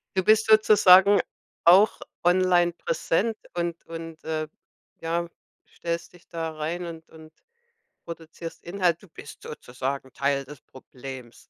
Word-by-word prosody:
Du 190 - +1
bist 215 +2 +4
sozusagen 205 -2 +6 0.5
auch 190 +5 +6 0.2
online 175 -1 +3
präsent 195 +7 -1 0.2
und 170 -1 -3
und, 165 -1 -9
äh, 155 -1 -3 0.5
ja, 170 +1 -2 0.4
stellst 170 0 -5
dich 175 - -20
da 165 -1 -4
rein 165 +3 -4
und 165 -1 -10
und 160 0 -15 0.7
produzierst 165 0 -9
Inhalt. 175 -1 0
Du - - -15
bist 145 -3 -13
sozusagen 130 -1 -6
Teil 140 0 -1
des 145 0 -12
Problems. 130 -2 -12
165 Hz, 125 wpm, -25 LUFS, 155-180 Hz, 0.7 s, sozusagen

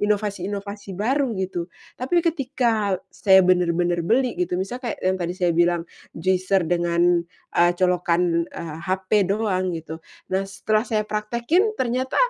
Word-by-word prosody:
inovasi-inovasi 200 -1 -2
baru, 265 +5 +1
gitu. 180 -2 -3 0.3
Tapi 335 +7 +2
ketika, 250 - 0 0.2
saya 190 -2 +5
bener-bener 175 -1 +2
beli 245 +7 +2
gitu, 180 0 0
misal 195 +7 -3
kayak 235 -3 -3
yang 185 0 +1
tadi 175 0 -2
saya 180 -2 +1
bilang, 175 0 +2 0.3
juicer 185 +2 +1
dengan, 175 0 +2 0.3
eee, 175 0 +5
colokan, 175 -2 +2
eee, 160 -3 -7
HP 190 0 -2 0.2
doang, 195 -3 0
gitu, 160 0 -7 0.3
nah, 190 +1 0
setelah 215 +3 0
saya 215 -2 0
praktekin 235 - 0
ternyata 255 - -1
190 Hz, 135 wpm, -23 LUFS, 175-220 Hz, 0.3 s, saya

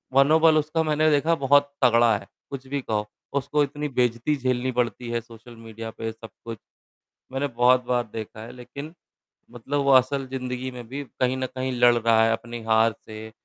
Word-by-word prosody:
मनोबल 155 +3 +5
उसका 155 +2 0
मैंने 155 0 +2
देखा 155 +3 +2
बहुत 145 +1 +4
तगड़ा 120 -2 +5
है, 100 - -13 0.2
कुछ 135 -1 -8
भी 140 +1 -3
कहो 105 -4 -2 0.3
उसको 150 +3 0
इतनी 145 +1 -4
बेइज्जती 125 +2 0
झेलनी 130 -1 -1
पड़ती 120 -1 -2
है 120 0 -1
सोशल 115 +1 -15
मीडिया 115 0 -8
पे 115 0 -5
सब 110 0 -12 0.2
कुछ। 115 -1 -6 0.7
मैंने 135 +2 -1
बहुत 125 0 +3
बार 120 -1 +1
देखा 110 -1 -7
है 115 - -9
लेकिन 140 +5 -9 0.6
मतलब 135 +4 -3
वो 140 - +4
असल 135 +1 +3
जिंदगी 130 0 -4
में 120 -2 -9
भी 140 +4 -5 0.2
कहीं 130 +1 +2
न 130 - -2
कहीं 130 0 -2
लड़ 120 0 +6
रहा 115 -1 +3
है 115 - +3
अपनी 115 +1 -4
हार 110 0 +3
से 110 0 -9
125 Hz, 185 wpm, -24 LUFS, 115-140 Hz, 0.7 s, लड़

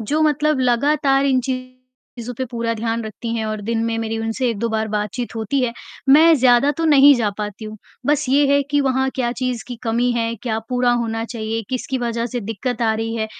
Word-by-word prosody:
जो 290 +8 -1
मतलब 300 -1 +2
लगातार 270 +2 +2
इन 265 -2 +3
चीज़ों 255 -1 -7
पर 260 - -1
पूरा 230 -1 -2
ध्यान 225 +1 -2
रखती 230 +2 -5
हैं 220 - -2
और 215 -1 -3
दिन 225 +2 -1
में 230 0 -1
मेरी 225 0 -3
उनसे 225 +3 -1
1-2 230 +1 -2
बार 220 -1 -1
बातचीत 210 +4 -3
होती 225 +5 -1
है, 245 -2 0 0.4
मैं 320 +4 +7
ज़्यादा 245 +2 +4
तो 330 +3 -3
नहीं 285 -2 +7
जा 220 -3 0
पाती 210 +1 -5
हूँ, 215 0 -7 0.3
बस 295 -2 +1
ये 280 +2 +4
है 285 - +4
कि 290 0 +2
वहाँ 265 -1 +1
क्या 245 -2 -1
चीज़ 250 -2 -3
की 245 - -6
कमी 240 +1 +1
है, 230 -1 -1
क्या 220 -3 -1
पूरा 250 -1 +1
होना 230 -1 -1
चाहिए, 225 -1 -4
किसकी 260 +1 -2
वज़ह 235 -1 -2
से 245 0 -4
दिक्कत 225 +3 -4
आ 220 -1 +3
रही 225 +1 -3
है, 220 - -1
240 Hz, 215 wpm, -20 LUFS, 225-260 Hz, 0.4 s, मैं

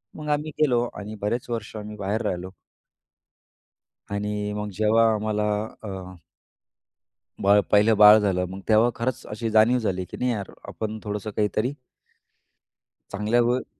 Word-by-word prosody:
मग 150 -1 -6
आम्ही 150 +1 0
गेलो 125 -6 +3
आणि 105 +1 -7
बरेच 120 +4 -2
वर्ष 110 -1 -4
आम्ही 105 0 -7
बाहेर 100 +3 -2
राहिलो. 90 +1 -3 1.6
आणि 105 0 -2
मग 105 0 -4
जेव्हा 110 +1 +4
आम्हाला 105 0 -1 0.4
अ 95 -2 -7 1.3
बाळ, 100 +1 +6
पहिलं 105 +2 +5
बाळ 105 +1 +9
झालं 95 -3 0
मग 95 +1 -7
तेव्हा 110 +2 +5
खरंच 130 +2 -3
अशी 115 +2 -3
जाणीव 110 +3 +5
झाली 95 -4 -2
की - - -7
नाही 125 0 0
यार 100 -4 -4 0.2
आपण 110 0 -5
थोडंसं 105 0 -4
काहीतरी 110 +5 0 1.4
चांगल्यावर. 120 +5 +1
105 Hz, 135 wpm, -24 LUFS, 105-115 Hz, 1.6 s, बाळ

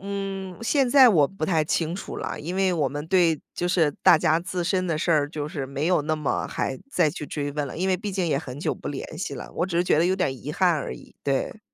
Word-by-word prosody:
嗯， 195 -1 -5
现 270 +2 +2
在 260 0 +8
我 155 -9 +5
不 195 -2 -5
太 160 -4 +2
清 165 +2 -1
楚 195 - -6
了， - - -4
因 170 +5 -5
为 190 -1 +2
我 150 -5 +1
们 145 +3 -5
对 170 -5 +3
就 175 - -1
是 170 -4 +3
大 - - +8
家 155 +1 +2
自 180 +1 -3
身 185 +1 0
的 165 -3 0
事 170 - -1
儿 145 -2 +3
就 150 -1 -4
是 140 -3 -4
没 140 +3 -3
有 175 -4 +3
那 155 +1 0
么 150 -3 -1
还 130 - -3
再 170 - +2
去 150 -2 -7
追 145 -1 -3
问 145 -1 -2
了。 130 - -8
因 185 +3 0
为 185 - +2
毕 200 +1 -5
竟 185 -2 0
也 140 - +1
很 140 -1 -7
久 - - -1
不 - - -11
联 145 +2 -6
系 - - -3
了， - - -8
我 175 - 0
只 170 -2 -3
是 175 - +4
觉 165 - +2
得 170 - +4
有 185 - +2
点 185 -6 +1
儿 - - -2
遗 135 +3 -7
憾 185 +1 +3
而 150 - -3
已， - - -15
对。 140 +9 -1
170 Hz, 300 characters per minute, -25 LUFS, 150-185 Hz, -, 在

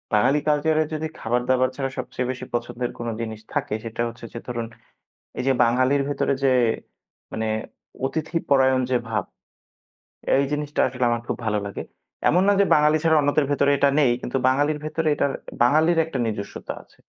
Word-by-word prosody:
বাঙালি 130 +8 +4
কালচারে 155 +1 +2
যদি 155 +1 -2
খাবার-দাবার 125 +2 +1
ছাড়া 135 -1 -2
সবচেয়ে 125 0 -3
বেশি 130 - -7
পছন্দের 120 +1 -2
কোনো 120 -1 -3
জিনিস 110 -1 -5
থাকে 145 -3 -1
সেটা 115 0 -4
হচ্ছে 115 0 -9
যে 115 - -5
ধরুন 120 -2 -3 0.7
এই - - -1
যে 135 - +4
বাঙালির 130 +4 +2
ভেতরে 140 -1 0
যে 135 - +5 0.8
মানে 110 0 -2 0.6
অতিথিপরায়ণ 140 -4 +1
যে 130 - +3
ভাব 110 - -1 1.1
এই 140 - +3
জিনিসটা 150 0 -1
আসলে 125 -1 -3
আমার 120 0 0
খুব - - -2
ভালো 105 -1 +1
লাগে। 100 - -5 0.5
এমন 175 +4 +4
না 205 - +5
যে - - +4
বাঙালি 150 +1 +4
ছাড়া 160 -1 +4
অন্যদের 145 +1 +2
ভেতরে 140 0 +3
এটা 140 +1 +4
নেই 135 -5 +4
কিন্তু 130 - -2
বাঙালির 145 +3 +2
ভেতরে 155 +1 -2
এটার 140 - +1 0.3
বাঙালির 155 +7 +4
একটা 160 -4 -5
নিজস্বতা 105 -2 -5
আছে। - - -28
135 Hz, 170 wpm, -23 LUFS, 120-150 Hz, 1.1 s, যে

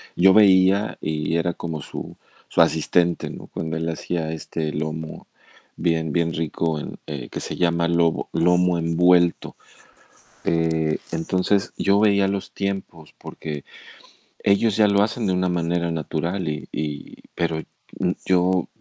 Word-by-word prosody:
yo 95 +2 +6
veía 100 0 +5
y 75 +1 -1
era 85 +1 0
como 80 -3 -5
su - - -8 0.3
su - - +2
asistente, 85 +1 +2
¿no?, - - -9
cuando 80 0 -4
él 80 +1 -2
hacía, 80 0 -3
este, 80 -1 -4
lomo 80 +1 -5 0.5
bien 80 -3 0
bien 85 -1 +1
rico 80 -1 -1
en - - -7
eh, 70 -6 -5
que - - -5
se - - -5
llama 85 -1 +2
lobo 85 -1 +1
lomo 90 +2 +3
envuelto, 85 +1 +3 0.9
eh, 80 -1 +1
entonces, 90 +4 0
yo 100 +1 +3
veía 100 -2 +4
los 100 -1 -3
tiempos 95 -5 -5
porque, 75 -2 -7 0.8
ellos 100 +1 +3
ya 105 -1 +5
lo 100 0 +3
hacen 110 +2 -2
de 95 - +1
una 90 0 +1
manera 85 0 0
natural 85 +3 -2
y 75 0 -5
y 75 -1 -4 0.2
pero, 85 -2 -1 0.4
mm, 90 -1 +1
yo 90 -1 +2
85 Hz, 145 wpm, -23 LUFS, 80-95 Hz, 0.9 s, yo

